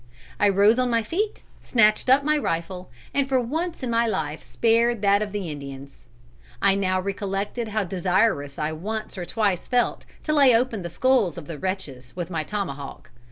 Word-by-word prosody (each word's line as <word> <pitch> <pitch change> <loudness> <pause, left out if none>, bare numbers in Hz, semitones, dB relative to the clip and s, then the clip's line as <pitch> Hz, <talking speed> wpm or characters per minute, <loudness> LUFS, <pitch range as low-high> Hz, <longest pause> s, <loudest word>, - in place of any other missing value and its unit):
I 205 - +4
rose 205 +5 +4
on 250 -1 +2
my 230 -1 +1
feet, 405 - -2 0.2
snatched 215 0 +3
up 270 +2 +5
my 305 +1 +2
rifle, 180 - -3 0.2
and 280 -1 +1
for 260 -1 +3
once 320 +7 -3
in 245 - -2
my 230 0 +2
life 160 -7 -2
spared 230 -1 +1
that 200 0 +4
of 210 -1 -4
Indians. 140 -8 -7 0.5
I 200 -1 +4
now 185 -1 +1
recollected 200 +4 -3
how 215 0 -1
desirous 180 -5 0
I 150 +1 -1
once 215 +8 -5
or 180 -3 -5
twice 200 -3 -1
felt 245 -1 0 0.2
to 305 - 0
lay 275 -5 +6
open 230 -3 0
the 170 - -5
skulls 230 - +2
of 170 - -7
the 160 -2 -7
wretches 145 -10 -5
with 180 0 -5
my 160 -2 -1
tomahawk. 145 -9 -5
200 Hz, 180 wpm, -24 LUFS, 175-235 Hz, 0.5 s, lay